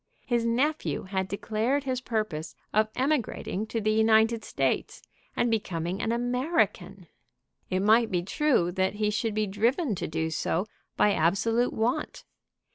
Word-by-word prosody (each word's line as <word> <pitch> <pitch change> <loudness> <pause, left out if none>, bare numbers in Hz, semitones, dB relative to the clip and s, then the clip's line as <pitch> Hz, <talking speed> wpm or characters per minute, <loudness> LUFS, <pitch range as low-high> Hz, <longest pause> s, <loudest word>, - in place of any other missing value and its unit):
His 240 -2 +1
nephew 275 +7 0
had 190 0 -2
declared 220 +7 -1
his 255 -2 -2
purpose 215 -10 -3 0.2
of 215 +1 +3
emigrating 255 -6 -1
to 225 - -2
the 215 0 +1
United 220 +1 +3
States - - -2 0.3
and 240 - +1
becoming 185 -4 -2
an 225 - 0
American. 250 +8 0 0.6
It 185 0 0
might 220 +3 +4
be 180 -2 0
true 220 - +1
that 190 +2 0
he 210 0 0
should 215 0 -1
be 215 0 +1
driven 230 - 0
to 185 - -3
do 160 +1 -2
so 165 +3 -1 0.3
by 205 - +4
absolute 210 +8 +2
want. 225 +3 -2
220 Hz, 145 wpm, -27 LUFS, 190-240 Hz, 0.6 s, might